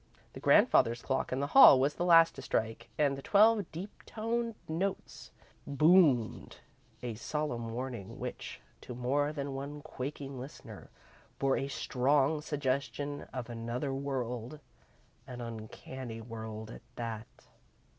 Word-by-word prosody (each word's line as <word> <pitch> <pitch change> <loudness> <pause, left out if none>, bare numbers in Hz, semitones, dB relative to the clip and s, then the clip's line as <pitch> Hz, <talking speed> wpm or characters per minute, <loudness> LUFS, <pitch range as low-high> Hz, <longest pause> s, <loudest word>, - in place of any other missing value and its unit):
The - - -8
grandfather's 115 +1 +4
clock 130 - -1
in 130 +2 -1
the - - +1
hall 205 - +10
was 140 +3 +2
the 175 - -2
last 165 -1 +7
to 135 - -9
strike, 110 -3 -2
and 145 -2 +2
the 135 - -8
twelve 210 +2 +4
deep 185 +6 -6 0.2
toned 230 +1 -2
notes 185 +5 -3 0.4
boomed 145 -5 +3 0.5
a 120 -2 -3
solemn 120 0 -3
warning 120 -4 -5
which, - - -6 0.2
to 125 - -8
more 140 +4 0
than 140 -2 -4
one 140 +2 -6
quaking 135 0 -6
listener, 135 +4 -10 0.5
bore 135 -1 +2
a 135 - -2
strong 140 +3 +1
suggestion 145 0 -2
of 125 -3 -5
another 120 +3 -3
world 130 -1 -4 0.7
an 125 -1 -8
uncanny 115 +1 -7
world 110 -1 -7
at - - -10
that. 115 -1 -5
135 Hz, 135 wpm, -31 LUFS, 120-150 Hz, 0.7 s, hall